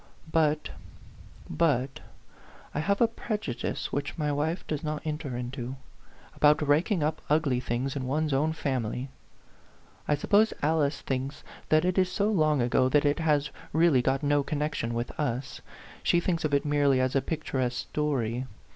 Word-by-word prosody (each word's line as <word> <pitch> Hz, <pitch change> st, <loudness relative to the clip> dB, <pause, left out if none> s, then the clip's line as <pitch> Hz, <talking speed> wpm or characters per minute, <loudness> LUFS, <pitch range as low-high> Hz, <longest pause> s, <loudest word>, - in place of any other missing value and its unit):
" 160 Hz, -, -18 dB
But 150 Hz, 0 st, 0 dB, 0.8 s
but 135 Hz, -5 st, 0 dB, 0.7 s
I -, -, -1 dB
have 200 Hz, +7 st, 0 dB
a 235 Hz, -, +6 dB
prejudice 215 Hz, -, -4 dB
which 145 Hz, +3 st, -3 dB
my 150 Hz, -2 st, 0 dB
wife 155 Hz, +5 st, -1 dB
does 155 Hz, 0 st, -3 dB
not 155 Hz, -1 st, -3 dB
enter 150 Hz, -5 st, -3 dB
into, 125 Hz, +1 st, -5 dB, 0.6 s
about 150 Hz, 0 st, +4 dB
raking 160 Hz, +4 st, +2 dB
up 155 Hz, +1 st, -1 dB
ugly 150 Hz, -4 st, +2 dB
things 125 Hz, +3 st, -2 dB
in 130 Hz, -2 st, -3 dB
one's 150 Hz, +2 st, 0 dB
own 150 Hz, +4 st, +2 dB
family. 130 Hz, -4 st, -2 dB, 1.0 s
I 150 Hz, -, +3 dB
suppose 205 Hz, +9 st, +3 dB
Alice 150 Hz, -2 st, +1 dB
thinks 135 Hz, +1 st, -3 dB, 0.3 s
that 155 Hz, +2 st, +4 dB
it 185 Hz, +1 st, +2 dB
is 185 Hz, -1 st, +2 dB
so 205 Hz, +3 st, +1 dB
long 155 Hz, -, +3 dB
ago 130 Hz, +1 st, +3 dB
that 145 Hz, +2 st, +3 dB
it 145 Hz, +2 st, +2 dB
has 150 Hz, -2 st, +1 dB, 0.2 s
really 160 Hz, -5 st, +4 dB
got 135 Hz, +3 st, 0 dB
no 145 Hz, 0 st, +3 dB
connec 150 Hz, +1 st, -2 dB
tion 115 Hz, -3 st, -2 dB
with 120 Hz, +1 st, -2 dB
us; 135 Hz, -2 st, -2 dB, 0.4 s
she 175 Hz, -, +3 dB
thinks 175 Hz, -1 st, -1 dB
of 155 Hz, -, 0 dB
it 140 Hz, -, +1 dB
merely 145 Hz, -2 st, +3 dB
as 130 Hz, +1 st, 0 dB
a 135 Hz, -, +4 dB
picturesque 130 Hz, -4 st, -2 dB
story. 130 Hz, -5 st, -1 dB
145 Hz, 165 wpm, -28 LUFS, 130-155 Hz, 1.0 s, a